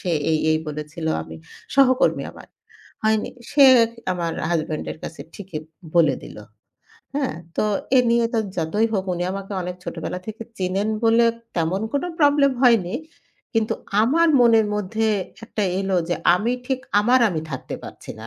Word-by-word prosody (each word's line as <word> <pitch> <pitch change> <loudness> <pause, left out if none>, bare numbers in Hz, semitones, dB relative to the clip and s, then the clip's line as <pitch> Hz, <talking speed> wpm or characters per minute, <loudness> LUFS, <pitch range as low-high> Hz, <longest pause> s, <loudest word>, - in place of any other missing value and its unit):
সে 180 - -3 0.2
এই, 155 - +2
এই 155 - +3
বলেছিল। 150 +2 -6 0.2
আমি 80 0 -10 0.4
সহকর্মী 260 -2 +4
আমার। - - -13 0.6
হয়নি 220 0 +1 0.2
সে 285 -1 +6 0.5
আমার 170 -2 -2 0.2
husband 155 -2 -1
এর - - -10
কাছে 160 - -7
ঠিকই 190 -6 -6 0.4
বলে 155 -6 +4
দিল। - - -11 0.8
হ্যাঁ? 270 - -1 0.2
তো - - +1 0.3
এ - - +7
নিয়ে 235 0 +3
তো - - +2 0.2
যতই 175 +7 +1
হোক 190 -3 0
উনি 175 - -2
আমাকে 195 +1 -6
অনেক 180 0 -5
ছোটবেলা 180 - -4
থেকে 220 +1 -6 0.2
চেনেন 190 +3 -1 0.2
বলে 230 +1 +5 0.3
তেমন 170 +4 0
কোনো 285 +5 0
problem 285 -2 +4
হয়নি। 225 -6 +4 0.6
কিন্তু 225 -1 +1 0.3
আমার 325 +9 +3
মনের 225 -2 +5
মধ্যে 215 +2 -1 0.4
একটা 215 -1 -3 0.2
এলো 195 -1 0
যে 175 - +1 0.2
আমি 220 +7 0
ঠিক 260 -1 -1 0.2
আমার 245 +5 +4
আমি 165 -5 -2
থাকতে 130 - -5
পারছি - - -10
না। 110 - -8
210 Hz, 160 wpm, -22 LUFS, 170-235 Hz, 0.8 s, এ